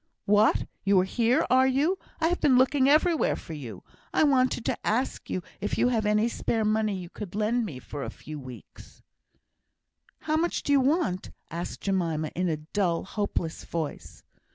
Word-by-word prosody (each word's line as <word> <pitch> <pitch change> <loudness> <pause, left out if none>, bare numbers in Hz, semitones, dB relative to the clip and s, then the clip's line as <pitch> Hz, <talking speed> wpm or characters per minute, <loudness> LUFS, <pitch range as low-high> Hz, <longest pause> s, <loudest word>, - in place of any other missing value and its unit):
"What, 210 +2 +4 0.2
you 195 -1 +4
are - - +3
here, 235 +5 +2
are 260 +1 +5
you? 295 +8 +1 0.2
I 325 0 +2
have 355 - -1
been 260 -4 +5
looking 260 +1 +4
everywhere 315 +2 +3
for 165 - -9
you. 120 -11 -8 0.3
I - - +3
wanted 255 -5 +2
to - - 0
ask 245 +5 -1
you 185 - -2 0.2
if 205 - -2
you 245 - +3
have 220 -4 0
any 210 +2 +3
spare 225 -1 -1
money 215 -1 +1
you 180 -1 -7
could 200 -3 -8
lend 220 +2 +1
me 145 -9 -7
for 140 +2 -7
a - - -4
few 150 0 -9
weeks?" 130 -3 -12 1.2
"How 310 0 0
much 340 +2 0
do - - -1
you 280 - +6
want?" 275 - 0 0.2
asked 170 +1 -5
Jemima, 165 -6 -1
in 180 0 0
a 155 - 0
dull, 170 +2 -1
hopeless 195 -5 -3
voice. 160 -3 -5
210 Hz, 180 wpm, -27 LUFS, 175-260 Hz, 1.2 s, you